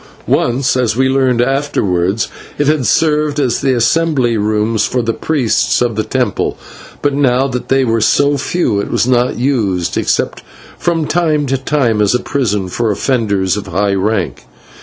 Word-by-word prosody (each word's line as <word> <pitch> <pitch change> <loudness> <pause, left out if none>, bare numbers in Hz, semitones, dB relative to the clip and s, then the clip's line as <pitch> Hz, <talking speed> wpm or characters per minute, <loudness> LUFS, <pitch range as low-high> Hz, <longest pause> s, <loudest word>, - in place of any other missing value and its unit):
Once, 125 +2 +1
as 125 -4 +1
we 130 0 +3
learned 130 -2 +2
afterwards, 110 -8 0 0.3
it 145 - +1
had 145 -4 +1
served 150 -2 +1
as 130 -5 0
the 130 -1 +1
assembly 130 0 +1
rooms 110 +1 0
for 125 -1 -1
the 115 0 -1
priests 135 -6 0
of 120 -2 0
the 110 - 0
temple, - - -1 0.5
but 145 -1 +1
now 135 -1 +2
that 125 -2 -5
they 135 0 +3
were 115 -1 0
so 145 +6 +3
few 140 - -1
it 100 - -3
was - - +1
not 125 0 +1
used, 110 -9 0
except - - -1 0.4
from 165 -2 0
time 155 -3 +1
to 135 0 0
time 130 -5 0
as 105 +3 +2
a - - +1
prison 105 -9 -1
for 115 +5 -1
offenders 100 -4 0
of 105 - -5
high 100 +3 0
rank. 95 - -2
125 Hz, 170 wpm, -14 LUFS, 105-140 Hz, 0.5 s, we